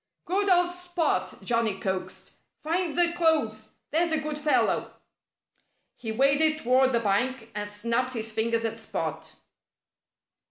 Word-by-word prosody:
"Good 400 Hz, +3 st, +1 dB
old 355 Hz, -1 st, +4 dB
Spot!" 355 Hz, -1 st, -2 dB
Johnnie 230 Hz, -5 st, +1 dB
coaxed. 185 Hz, -1 st, -4 dB, 0.3 s
"Find 335 Hz, +1 st, -1 dB
the 345 Hz, -1 st, +3 dB
clothes! 295 Hz, -11 st, +1 dB, 0.2 s
There's 335 Hz, +2 st, +2 dB
a 315 Hz, -, +2 dB
good 305 Hz, 0 st, -3 dB
fellow!" 300 Hz, 0 st, +1 dB, 1.0 s
He 225 Hz, -3 st, -5 dB
waded 280 Hz, +6 st, +3 dB
toward 260 Hz, -1 st, +3 dB
the 235 Hz, -, +2 dB
bank 230 Hz, +3 st, -1 dB
and 205 Hz, 0 st, -4 dB
snapped 235 Hz, +5 st, -1 dB
his 225 Hz, -1 st, -3 dB
fingers 230 Hz, +1 st, 0 dB
at 225 Hz, 0 st, -3 dB
Spot. 220 Hz, -, -4 dB
255 Hz, 130 wpm, -27 LUFS, 225-320 Hz, 1.0 s, old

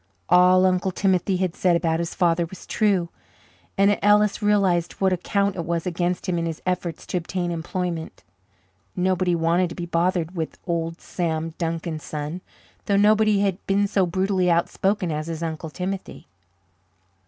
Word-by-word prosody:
All 180 Hz, +1 st, +6 dB
Uncle 185 Hz, 0 st, +2 dB
Timothy 190 Hz, 0 st, +1 dB
had 180 Hz, -2 st, -1 dB
said 180 Hz, -2 st, +2 dB
about 165 Hz, -1 st, +1 dB
his 170 Hz, 0 st, -3 dB
father 170 Hz, -1 st, +2 dB
was 190 Hz, -, -12 dB
true, 195 Hz, -6 st, +1 dB, 0.7 s
and 200 Hz, +1 st, +3 dB
Ellis 210 Hz, +1 st, +3 dB
realized 195 Hz, -5 st, +2 dB
what 190 Hz, -1 st, +1 dB
a -, -, 0 dB
count 200 Hz, +2 st, 0 dB
it 170 Hz, -, -3 dB
was 170 Hz, 0 st, -2 dB
against 180 Hz, +1 st, -2 dB
him 175 Hz, -2 st, 0 dB
in 165 Hz, -, -1 dB
his 160 Hz, -2 st, -4 dB
efforts 180 Hz, -2 st, -2 dB
to -, -, -2 dB
obtain 175 Hz, 0 st, -3 dB
employment. 170 Hz, 0 st, -4 dB, 0.7 s
Nobody 185 Hz, -1 st, +1 dB
wanted 170 Hz, +2 st, +2 dB
to 170 Hz, -, -8 dB
be 175 Hz, -, -4 dB
bothered 175 Hz, 0 st, 0 dB
with 160 Hz, -2 st, -4 dB
"Old 165 Hz, -1 st, -2 dB
Sam 165 Hz, -2 st, -3 dB
Duncan's 165 Hz, -1 st, -3 dB
son," 150 Hz, +4 st, -5 dB, 0.5 s
though 200 Hz, -1 st, +3 dB
nobody 210 Hz, 0 st, +4 dB
had 195 Hz, -1 st, -1 dB
been 200 Hz, +1 st, +2 dB
so 195 Hz, -2 st, +1 dB
brutally 185 Hz, +1 st, +1 dB
outspoken 180 Hz, +2 st, +1 dB
as 155 Hz, +1 st, -3 dB
his 165 Hz, 0 st, -4 dB
Uncle 160 Hz, 0 st, -4 dB
Timothy. 185 Hz, +4 st, -5 dB
180 Hz, 165 wpm, -23 LUFS, 170-190 Hz, 0.7 s, All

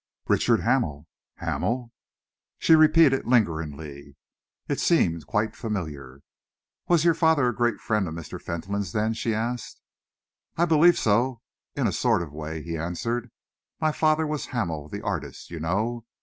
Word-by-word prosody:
"Richard -, -, +3 dB
Hamel." 75 Hz, +1 st, 0 dB, 0.3 s
"Hamel." 120 Hz, 0 st, -2 dB, 0.7 s
She 165 Hz, -, +4 dB
repeated 155 Hz, -2 st, +6 dB
it 135 Hz, -, -2 dB
lingeringly. 75 Hz, -, -1 dB, 0.5 s
It -, -, -1 dB
seemed 85 Hz, -1 st, +2 dB
quite 110 Hz, +1 st, +1 dB
unfamiliar. 75 Hz, -, -6 dB, 0.7 s
"Was 170 Hz, -2 st, +3 dB
your 170 Hz, -, +6 dB
father 160 Hz, -5 st, +3 dB
a 120 Hz, -, -4 dB
great 120 Hz, -2 st, +1 dB
friend 105 Hz, -4 st, 0 dB
of 80 Hz, -, -5 dB
Mr. 85 Hz, -1 st, -8 dB
Fentolin's, 95 Hz, +3 st, -4 dB
then?" 110 Hz, +1 st, +1 dB
she 115 Hz, 0 st, -1 dB
asked. 120 Hz, +2 st, -4 dB, 0.8 s
"I 170 Hz, -, +4 dB
believe 170 Hz, +1 st, +5 dB
so, 115 Hz, +3 st, +1 dB, 0.3 s
in -, -, 0 dB
a -, -, +2 dB
sort -, -, +2 dB
of 75 Hz, -4 st, -10 dB
way," 80 Hz, +1 st, -6 dB
he 85 Hz, -1 st, -4 dB
answered. 115 Hz, +9 st, -3 dB, 0.5 s
"My 155 Hz, -1 st, +2 dB
father 155 Hz, +1 st, +2 dB
was 150 Hz, -1 st, -3 dB
Hamel 80 Hz, -, -3 dB
the -, -, -6 dB
artist, -, -, -5 dB
you 85 Hz, -, -5 dB
know. 110 Hz, +9 st, -1 dB
110 Hz, 150 wpm, -25 LUFS, 80-130 Hz, 0.8 s, repeated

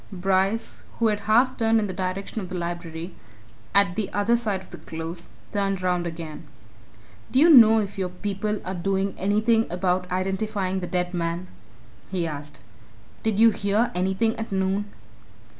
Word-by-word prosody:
Bryce, 195 Hz, +3 st, 0 dB
who 230 Hz, -1 st, +3 dB
had 210 Hz, -1 st, 0 dB
half 250 Hz, +4 st, +4 dB
turned 225 Hz, -1 st, +3 dB
in 215 Hz, -, 0 dB
the 190 Hz, -, -4 dB
direction 190 Hz, +3 st, -3 dB
of 185 Hz, -, -7 dB
the 185 Hz, -, -4 dB
Library, 170 Hz, 0 st, -5 dB, 0.6 s
at 200 Hz, -3 st, +4 dB
the 210 Hz, -1 st, -2 dB
other 205 Hz, +4 st, +2 dB
side 215 Hz, -5 st, -1 dB
of 190 Hz, -, -16 dB
the -, -, -9 dB
Close, 165 Hz, +1 st, -5 dB, 0.2 s
turned 195 Hz, -2 st, -1 dB
round 180 Hz, -1 st, +1 dB
again. 165 Hz, -2 st, -7 dB, 0.8 s
"Do -, -, 0 dB
you 325 Hz, +5 st, +7 dB
know 225 Hz, -6 st, +9 dB
if 200 Hz, -2 st, -2 dB
your 185 Hz, -1 st, -1 dB
people 205 Hz, +3 st, -3 dB
are 185 Hz, -, -3 dB
doing 195 Hz, +2 st, -1 dB
anything 215 Hz, +3 st, +2 dB
about 180 Hz, 0 st, 0 dB
identifying 190 Hz, +1 st, -1 dB
the 180 Hz, -, -4 dB
dead 180 Hz, -1 st, -1 dB
man?" 170 Hz, +1 st, -2 dB, 0.6 s
he 180 Hz, -3 st, -1 dB
asked. 150 Hz, -5 st, -6 dB, 0.6 s
"Did 220 Hz, -2 st, 0 dB
you 230 Hz, 0 st, +7 dB
hear 205 Hz, +3 st, +1 dB
anything 190 Hz, +5 st, +1 dB
at 225 Hz, -1 st, -5 dB
noon?" 190 Hz, +1 st, 0 dB
190 Hz, 165 wpm, -25 LUFS, 180-215 Hz, 0.8 s, know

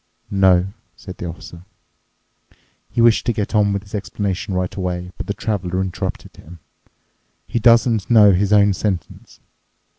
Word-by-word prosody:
"No," 95 Hz, -2 st, +4 dB, 0.3 s
said 95 Hz, -1 st, -11 dB
the 90 Hz, -, -6 dB
Officer. 85 Hz, 0 st, -10 dB, 1.3 s
He 120 Hz, -, -1 dB
wished 115 Hz, -1 st, +4 dB
to 120 Hz, -, +2 dB
get 105 Hz, 0 st, -3 dB
on 105 Hz, -2 st, +3 dB
with 100 Hz, 0 st, -2 dB
his 100 Hz, -, -18 dB
explanation 100 Hz, -1 st, -3 dB
right 90 Hz, 0 st, -2 dB
away, 90 Hz, -2 st, -4 dB
but -, -, -7 dB
the 100 Hz, -, -1 dB
Traveler 95 Hz, -4 st, -3 dB
interrupted 95 Hz, -1 st, -5 dB
him: 85 Hz, +3 st, -13 dB, 0.9 s
"He 120 Hz, -, -2 dB
doesn't 115 Hz, -2 st, +3 dB
know 105 Hz, -4 st, +7 dB
his 95 Hz, +2 st, +1 dB
own 100 Hz, -1 st, +5 dB
sentence?" 95 Hz, -2 st, -5 dB
100 Hz, 150 wpm, -19 LUFS, 90-105 Hz, 1.3 s, know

